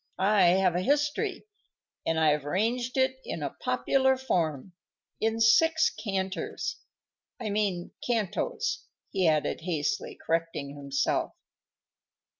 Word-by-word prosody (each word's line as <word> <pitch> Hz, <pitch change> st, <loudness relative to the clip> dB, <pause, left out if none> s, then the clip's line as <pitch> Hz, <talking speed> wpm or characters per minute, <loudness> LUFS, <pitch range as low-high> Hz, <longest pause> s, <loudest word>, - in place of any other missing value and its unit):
I 195 Hz, 0 st, +4 dB
have 185 Hz, -3 st, +3 dB
a 180 Hz, -, +1 dB
history, 290 Hz, -, 0 dB, 0.6 s
and 165 Hz, 0 st, +1 dB
I've 150 Hz, -2 st, +3 dB
arranged 235 Hz, -, -1 dB
it 260 Hz, 0 st, +2 dB
in -, -, -5 dB
a -, -, -2 dB
popular 265 Hz, -1 st, +1 dB
form, 175 Hz, -, -1 dB, 0.5 s
in 225 Hz, +1 st, 0 dB
six 320 Hz, +8 st, +5 dB
canters, 190 Hz, -3 st, -3 dB, 0.6 s
I 220 Hz, -4 st, -3 dB
mean 200 Hz, -4 st, -1 dB, 0.2 s
cantos," 240 Hz, -, -1 dB, 0.2 s
he 185 Hz, -3 st, +2 dB
added, 155 Hz, 0 st, +1 dB
hastily 165 Hz, +3 st, -2 dB
correcting 160 Hz, -4 st, -1 dB
himself. 140 Hz, -1 st, -1 dB
195 Hz, 110 wpm, -28 LUFS, 165-250 Hz, 0.6 s, six